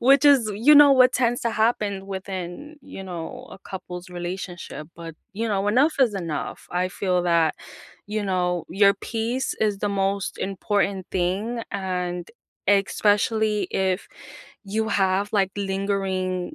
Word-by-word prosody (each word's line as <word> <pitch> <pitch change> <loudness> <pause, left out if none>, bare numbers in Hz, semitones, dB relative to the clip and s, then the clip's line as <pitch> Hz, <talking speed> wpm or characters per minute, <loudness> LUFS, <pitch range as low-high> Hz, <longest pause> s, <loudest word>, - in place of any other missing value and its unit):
Which 275 +3 +5
is, 270 -7 +5
you 255 +9 +6
know, 290 -1 +9
what 255 -1 +6
tends 245 -1 +1
to 235 - 0
happen 210 -3 0
within, 190 - -6
you 275 -8 -9
know, 175 -3 -7
a - - -11
couple's 180 -2 -8
relationship, 175 -3 -6
but, 165 -1 -8 0.2
you 225 +3 -2
know, 205 -1 0
enough 265 +9 +3
is 240 -6 +4
enough, 170 -6 -4
I 180 +1 0
feel 180 -1 0
that, 170 -2 +3 0.5
you 210 +1 -2
know, 180 -3 0
your 200 0 +5
peace 230 +5 -2
is 210 -2 +1
the 205 - -1
most 195 0 -1
important 195 -1 -1
thing. 195 +6 -1
And 180 -3 -3 0.4
especially 205 +1 +2
if 190 0 -1 0.6
you 220 +2 -1
have 195 -1 +1
like 195 -3 +2
lingering, 195 0 -2
195 Hz, 140 wpm, -24 LUFS, 185-220 Hz, 0.6 s, know